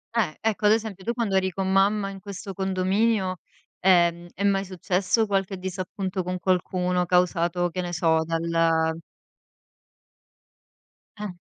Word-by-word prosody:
Eh. 215 -9 +1
Ecco, 220 -1 0
ad 210 - +6
esempio, 215 -4 -3
tu 235 - 0
quando 225 -5 -1
eri 190 0 +2
con 190 +1 -2
mamma 195 +1 +2
in 195 0 -8
questo 200 0 -7
condominio, 190 +1 0 0.4
ehm, 175 -2 +3
è 200 - -4
mai 195 -1 +2
successo 185 +3 0
qualche 195 -1 -1
disappunto 185 +1 -4
con 180 0 -3
qualcuno, 180 0 0
causato, 175 0 +1
che 180 +2 -3
ne 175 0 -5
so, 160 -1 +2
dal 165 0 +1 2.2
Eh. 210 0 -4
185 Hz, 135 wpm, -25 LUFS, 175-195 Hz, 2.2 s, ad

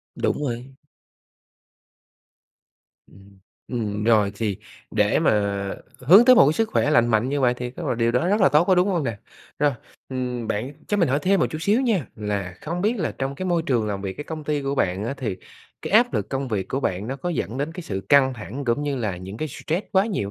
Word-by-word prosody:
Đúng 150 - -1
rồi. 125 +1 -5 2.3
Ừm, 100 0 -19 0.3
ừm, 105 -4 -3
rồi 105 -3 +4
thì 105 -2 -2 0.3
để - - +2
mà - - +3 0.7
hướng 185 - +7
tới 255 0 +8
một 135 - +7
cái - - +3
sức 225 +5 0
khỏe 150 - +2
lành 120 -6 +4
mạnh 115 +2 +1
như 145 0 -1
vậy 125 -1 +3
thì 125 0 -5
rất - - -9
là - - 0
điều 115 0 +1
đó 125 +9 +1
rất 205 +2 +2
là 190 - +6
tốt, 150 +5 +4
có 185 - +4
đúng 180 +2 +3
hông 175 -7 0
nè? 115 -4 -3 0.4
Rồi, 145 0 +3 0.4
ừm, 125 -3 -3
bạn 120 +7 -2 0.2
cho 205 - +1
mình 170 -7 +2
hỏi 140 +3 +2
thêm 195 +1 +3
một - - +3
chút 155 - -4
xíu 205 +9 +2
nha, 210 - +1
là 100 -4 -3
không 170 +3 -4
biết 220 +5 +1
là 165 - -1
trong 135 +1 -2
cái 185 +5 -4
môi 170 -2 +1
trường 115 -5 +1
làm 100 -1 -3
việc 95 -1 -3
cái 145 - -6
công 155 -2 -7
ty 145 -1 -1
của 135 +1 -1
bạn 95 -4 0
á 135 - -3
thì 110 -9 -3 0.5
cái - - -5
áp 240 +3 +5
lực - - -1
công 135 -1 -3
việc 100 -4 -2
của 135 - -2
bạn 95 -1 -2
nó 135 - -4
có 140 - -4
dẫn 130 - -3
đến 145 +3 -2
cái 180 +1 -7
sự 95 -9 -4
căng 135 -2 +5
thẳng 120 +5 -7
cũng 120 +4 0
như 145 -2 -2
là 105 -7 -2
những 95 +3 -8
cái 155 +3 -3
stress 165 - -3
quá 190 +2 +4
nhiều 105 - -2
135 Hz, 240 wpm, -23 LUFS, 110-160 Hz, 2.3 s, tới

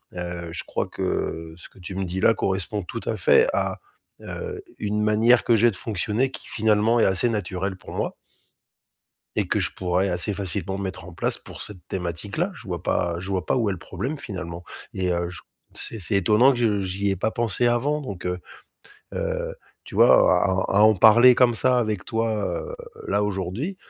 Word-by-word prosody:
heu, 85 -1 -5
je - - -4
crois - - -2
que 80 0 -3
ce 85 - -12
que - - -20
tu 90 +1 -7
me 95 0 -2
dis 90 +2 -3
là 115 - +5
correspond 95 +2 -1
tout 115 +6 -6
à 110 - -1
fait 460 +1 +5
à, - - -1 0.4
heu, 450 -3 -6 0.2
une 105 +1 -1
manière 110 +3 +4
que 115 - +4
j'ai 115 +2 +4
de - - -8
fonctionner 110 +6 -1
qui - - -10
finalement 110 +2 +2
est - - +5
assez 95 +5 +2
naturelle 95 -2 -3
pour - - -11
moi - - -2 1.2
et - - 0
que - - +1
je - - 0
pourrais 90 +2 0
assez 90 +4 -1
facilement 95 0 -3
mettre 95 -3 -5
en 90 - -10
place - - 0
pour - - -11
cette 100 -4 -8
thématique 90 +2 -4
là, 180 +5 0
je 120 - -13
vois 90 -2 -4
pas 85 -1 0
je 95 +2 -7
vois 95 -4 -1
pas - - +1
où 115 -4 +1
est - - 0
le 90 - -8
problème 145 +4 -4
finalement 90 -7 -6 0.3
et 90 -1 -1
heu, 85 0 -1
ch 90 - -9 0.3
c'est 115 - -5
c'est 100 +2 -1
étonnant 105 +8 +5
que 120 - -4
je 105 -4 +2
j'y 95 +2 -1
ai 95 - +1
pas 110 +5 -1
pensé 120 +1 0
avant 140 +6 +1
donc 100 -9 -7
heu 90 0 -2 0.7
heu, - - -3 0.3
tu - - -11
vois - - +6 0.3
à 95 - +2 0.2
à 100 - +3
à - - +6
en 110 0 +6
parler 120 +5 +7
comme 120 -1 +4
ça 125 +1 +3
avec 110 -5 -2
toi, 115 0 0
heu, 110 - -3 0.3
là 105 - +1
aujourd'hui 105 - -3
100 Hz, 210 wpm, -24 LUFS, 90-115 Hz, 1.2 s, parler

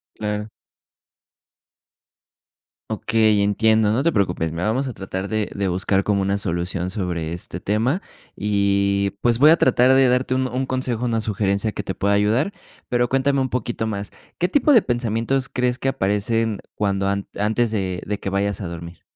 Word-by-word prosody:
Claro. 105 0 -3 2.4
Okey, 110 -2 +2
entiendo. 110 +1 +3
No 125 +5 +1
te 170 0 +2
preocupes, 90 -5 0
mira, 85 +4 -2
vamos 130 +5 0
a - - -4
tratar 95 -1 -5
de 110 -1 -1
de 100 -1 -1
buscar 95 +2 +1
como 100 -2 +1
una 100 +1 0
solución 90 -1 -2
sobre 90 -5 -3
este 85 +1 -6
tema. 115 - 0 0.3
Y, 100 -1 +1
pues, 120 -1 +2
voy 150 +4 +7
a 165 - +6
tratar 130 -1 +4
de 135 -1 +5
darte 125 +1 +1
un 130 0 +1
un 130 +2 -2
consejo, 130 -2 -2
una 115 -1 0
sugerencia 105 0 -1
que 105 - -4
te 95 - -4
pueda 100 +2 0
ayudar. 110 - +2 0.4
Pero 120 0 +2
cuéntame 135 +1 +1
un 130 - 0
poquito 120 -2 -2
más, 100 -2 -4 0.3
¿qué 180 - +1
tipo 290 +7 +3
de 235 -6 +6
pensamientos 120 +2 -1
crees 125 0 -1
que 135 - -1
aparecen 105 0 0 0.2
cuando 100 -1 0
an 100 0 -1
antes 110 +3 +1
de 95 -4 -2
de 105 0 -2
que - - -4
vayas 100 0 -1
a 95 - -4
dormir? 85 0 -9
105 Hz, 175 wpm, -22 LUFS, 100-125 Hz, 2.4 s, voy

